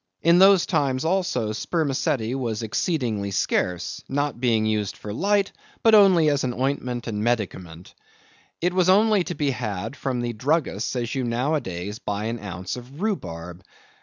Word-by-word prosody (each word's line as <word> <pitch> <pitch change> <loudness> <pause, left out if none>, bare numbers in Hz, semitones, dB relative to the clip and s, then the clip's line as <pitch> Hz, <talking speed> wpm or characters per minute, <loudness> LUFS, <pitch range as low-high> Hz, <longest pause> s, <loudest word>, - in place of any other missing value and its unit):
In 170 +2 +5
those 195 -1 +6
times, 135 -1 0
also, 165 - 0
spermaceti 130 -3 -1
was 115 -4 -2
exceedingly 110 - -1
scarce, 90 -2 -1
not 145 -2 -1
being 115 -4 +2
used 105 -2 -1
for 105 - -7
light, 200 - +1 0.3
but 225 - +5
only 190 -6 +6
as 140 -1 0
an 125 -2 -2
ointment 125 -2 -2
and 105 -2 -3
medicament. 95 -7 -3 0.7
It 180 +1 +1
was 185 -1 +3
only 210 0 +4
to 175 - -4
be 145 -2 0
had 110 -1 -4
from 130 -2 -2
the 120 0 -2
druggists 130 - -1
as 120 -2 -2
you 135 - -1
nowadays 115 - -2
buy 105 0 -3
an 115 +2 -3
ounce 90 -3 -5
of 125 +4 -11
rhubarb. 90 - -4
125 Hz, 160 wpm, -24 LUFS, 105-160 Hz, 0.7 s, those